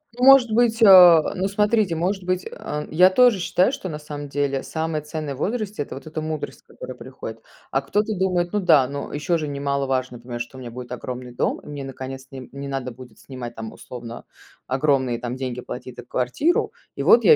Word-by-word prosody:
Может 250 -1 +7
быть, 230 0 +2
а, 180 -6 +8
ну, 190 +1 0
смотрите, 210 -1 +2
может 185 +4 -1
быть, 185 0 -1
а, 150 0 -5
я 180 +4 +6
тоже 240 +1 +5
считаю, 185 +4 +2
что 190 - -5
на 150 -2 -5
самом 145 -1 -7
деле 140 -1 -1
самое 160 -1 -3
ценное 150 -2 -5
в - - -13
возрасте- 215 -1 -2
это - - -9
вот 135 - -10
эта 155 0 -4
мудрость, 155 -1 -5
которая 130 - -9
приходит. 115 -2 -9 0.3
А 135 - +1
кто-то 205 +9 -1
думает: 180 -1 0
"Ну 210 - +2
да, 155 -8 +5
но 140 +1 -6
еще 150 +4 0
же 155 -2 -3
немаловажно 140 -3 -1
понимать, 120 0 -6
что 120 +2 -7
у - - -9
меня 120 -2 -7
будет 125 +1 -8
огромный 125 0 -6
дом, - - -1
и - - -17
мне, 145 -1 -6
наконец-то, 135 0 -8
не 130 -2 -8
не 140 +1 -7
надо 135 -2 -3
будет 125 -2 -14
снимать 125 -3 -8
там, 110 -1 -7
условно, 120 -1 -9 0.4
огромные 130 -3 +1
там 120 +1 -4
деньги 125 -2 -4
платить 125 0 -8
за 125 - -8
квартиру. 130 - 0 0.2
И - - -3
вот 465 - +6
я 465 - +9
145 Hz, 205 wpm, -23 LUFS, 130-185 Hz, 0.4 s, я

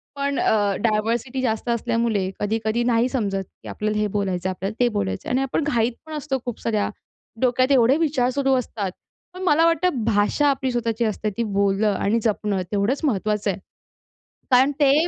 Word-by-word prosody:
पण 280 0 -1
अ, 205 -2 +2
डायव्हर्सिटी 230 +4 0
जास्त 230 -1 -1
असल्यामुळे 230 -4 0
कधी-कधी 220 +2 0
नाही 240 +1 +2
समजत, 200 -7 -1 0.2
की - - -10
आपल्याला 215 0 -2
हे 210 0 +1
बोलायचं 190 -3 -1
आहे, - - -2
आपल्याला 195 +4 -4
ते 245 - +4
बोलायचं 95 -1 -2
आहे - - -1
आणि 260 - +2
आपण 270 +4 -1
घाईत 240 -5 +1
पण 315 - -9
असतो 295 -3 -2
खूप 245 -3 -4
साऱ्या 215 -3 0 0.5
डोक्यात 255 +1 +2
एवढे 260 +1 +5
विचार 290 -6 +1
सुरू 270 0 +1
असतात. 215 -6 -3 0.4
पण 365 - -9
मला 325 -1 +4
वाटतं 335 -6 +1
भाषा 220 +7 +2
आपली 265 -1 0
स्वतःची 235 -1 -1
असते 215 0 -1
ती 235 - +1
बोलणं 200 +1 +2
आणि 210 +4 +1
जपणं 210 -3 0
तेवढंच 210 +7 0
महत्वाचं 210 -3 0
आहे. 185 - -7 0.9
कारण 260 +3 +5
ते 290 +3 +4
230 Hz, 180 wpm, -23 LUFS, 210-265 Hz, 0.9 s, एवढे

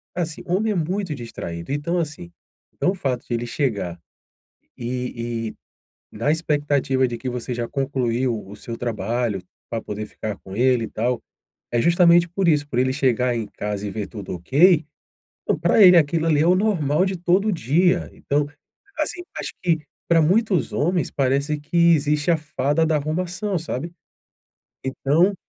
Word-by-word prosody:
assim, 165 -3 -3
homem 205 +5 +1
é - - -4
muito 180 +1 -1
distraído. 115 -6 -7
Então, 160 +5 -1
assim. 150 - -5 0.4
Então, 185 - +1
o - - -5
fato 130 -8 -2
de - - -3
ele 120 +1 -2
chegar, 115 - -2 0.8
e 120 -2 -3
e - - -12 0.6
na 120 +7 +2
expectativa 145 -4 +1
de 120 -1 -4
que 130 - -7
você 125 0 -4
já 120 -1 -3
concluiu 125 -5 -1
o 100 - -10
seu 115 +2 -7
trabalho, 115 -2 -2 0.3
pra 115 -1 -3
poder 105 0 -5
ficar 105 -1 -6
com 95 - -10
ele 125 0 +3
e - - -7
tal, 120 +2 -1 0.5
é 120 - +1
justamente 170 +2 +5
por 185 +1 0
isso. 150 -2 +3
Por 130 - -5
ele 130 0 +2
chegar 125 -2 +1
em 115 -2 -2
casa 105 0 -4
e - - -3
ver 105 -2 -4
tudo 105 -4 -7
ok, 155 - +4 0.6
então, - - 0
pra 170 +6 +4
ele 180 -2 +9
aquilo 160 +1 +2
ali 150 -2 +3
é 160 - +3
o 180 - +5
normal 185 -5 +2
de 190 0 -1
todo 185 +5 +2
dia. 175 - +2
Então, 145 +1 -1 0.5
assim, 310 +3 -2 0.2
acho - - -4
que 170 -3 +2 0.3
pra 170 -1 +4
muitos 190 +3 +2
homens 175 -1 0
parece 140 +3 0
que 170 +3 +4
existe 150 +2 +1
a 165 - +3
fada 150 0 0
da 160 -1 +2
arrumação, 180 +6 -2
sabe. 165 +1 -5 0.9
Então 150 +8 +2
145 Hz, 170 wpm, -22 LUFS, 120-170 Hz, 0.9 s, ele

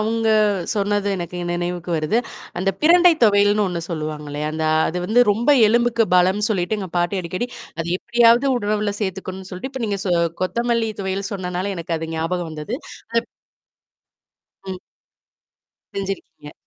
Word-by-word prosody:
அவுங்க 225 +1 0 0.4
சொன்னது 205 -1 0
எனக்கு 175 0 -5
நினைவுக்கு 175 0 -3
வருது. 155 +8 +1 0.4
அந்த 195 +2 +1
பிரண்டை 345 +2 +7
துவையல்ன்னு 205 0 +4
ஒன்னு 175 -2 -3
சொல்லுவாங்க 155 -3 -4
இல்லையா? 150 +1 -3
அந்த 160 0 -2 0.2
அது 180 - -3
வந்து 240 +3 +5
ரொம்ப 235 +7 +2 0.2
எலும்புக்கு 235 0 +3
பலம்னு 190 +4 +3
சொல்லிட்டு 195 +1 0
எங்க 190 - -5
பாட்டி 175 +3 0
அடிக்கடி, 185 +8 -3 0.3
அத 165 - -2
எப்படியாவது 240 +2 +4
உணவுல 210 -2 -1
சேர்த்துக்கணுன்னு 190 -1 -4
சொல்ட்டு, 185 +9 -5
இப்ப 260 -2 -5
நீங்க 200 -2 -1
சொ 180 - +2 0.3
கொத்தமல்லி 235 +3 0
துவையல் 195 +1 -3
சொன்னனால 185 +1 -3
எனக்கு 170 0 -3
அது 160 0 -5
ஞாபகம் 165 +1 -2
வந்தது. 155 +11 -4 0.4
அப் 230 - -2 1.4
ம். 185 - -3 1.2
செஞ்சிருக்கீங்க. 195 -6 -6
195 Hz, 140 wpm, -21 LUFS, 175-220 Hz, 1.4 s, பிரண்டை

